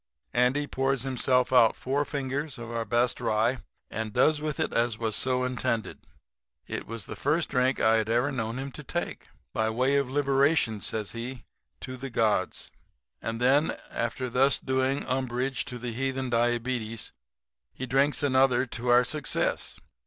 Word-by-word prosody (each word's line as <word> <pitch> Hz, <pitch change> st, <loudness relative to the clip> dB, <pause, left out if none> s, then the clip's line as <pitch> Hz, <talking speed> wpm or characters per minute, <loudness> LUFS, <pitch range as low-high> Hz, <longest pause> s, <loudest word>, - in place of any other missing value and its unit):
"Andy 125 Hz, +4 st, +2 dB
pours 135 Hz, -2 st, 0 dB
himself 130 Hz, -1 st, +1 dB
out 115 Hz, -3 st, +6 dB
four 140 Hz, +3 st, 0 dB
fingers 140 Hz, +1 st, -3 dB
of 120 Hz, 0 st, -7 dB
our 115 Hz, -1 st, -2 dB
best 120 Hz, +3 st, +1 dB
rye 115 Hz, +4 st, +1 dB, 0.3 s
and 110 Hz, 0 st, -3 dB
does 150 Hz, +6 st, +3 dB
with 150 Hz, -2 st, -3 dB
it -, -, 0 dB
as 115 Hz, -1 st, +1 dB
was 110 Hz, -2 st, -1 dB
so 125 Hz, +2 st, +1 dB
intended. 125 Hz, -3 st, -2 dB, 0.7 s
It -, -, -5 dB
was 115 Hz, -2 st, -5 dB
the -, -, -7 dB
first 155 Hz, +3 st, 0 dB
drink 130 Hz, 0 st, +1 dB
I 110 Hz, 0 st, +4 dB
had 110 Hz, 0 st, -1 dB
ever 120 Hz, +5 st, +2 dB
known 115 Hz, -2 st, -3 dB
him 135 Hz, +1 st, -4 dB
to -, -, -9 dB
take. -, -, -4 dB, 0.3 s
"'By 110 Hz, 0 st, +1 dB
way 130 Hz, +5 st, +2 dB
of 140 Hz, -2 st, 0 dB
liberation,' 140 Hz, -4 st, +2 dB
says 105 Hz, 0 st, -3 dB
he, 120 Hz, +1 st, -6 dB, 0.4 s
'to 130 Hz, 0 st, -6 dB
the 135 Hz, +2 st, -6 dB
gods.' 110 Hz, -6 st, 0 dB, 0.5 s
"And 115 Hz, 0 st, -3 dB
then 135 Hz, +5 st, +3 dB
after 120 Hz, +2 st, -2 dB
thus 130 Hz, +3 st, +3 dB
doing 130 Hz, +1 st, 0 dB
umbrage 130 Hz, 0 st, -1 dB
to 125 Hz, -, -6 dB
the 120 Hz, 0 st, -4 dB
heathen 130 Hz, +1 st, -2 dB
diabetes 120 Hz, -1 st, 0 dB, 0.6 s
he 130 Hz, -, -5 dB
drinks 135 Hz, +3 st, +2 dB
another 130 Hz, -2 st, +4 dB
to 120 Hz, 0 st, -6 dB
our 120 Hz, +1 st, +6 dB
success. 150 Hz, +2 st, -2 dB
125 Hz, 165 wpm, -28 LUFS, 115-135 Hz, 0.7 s, out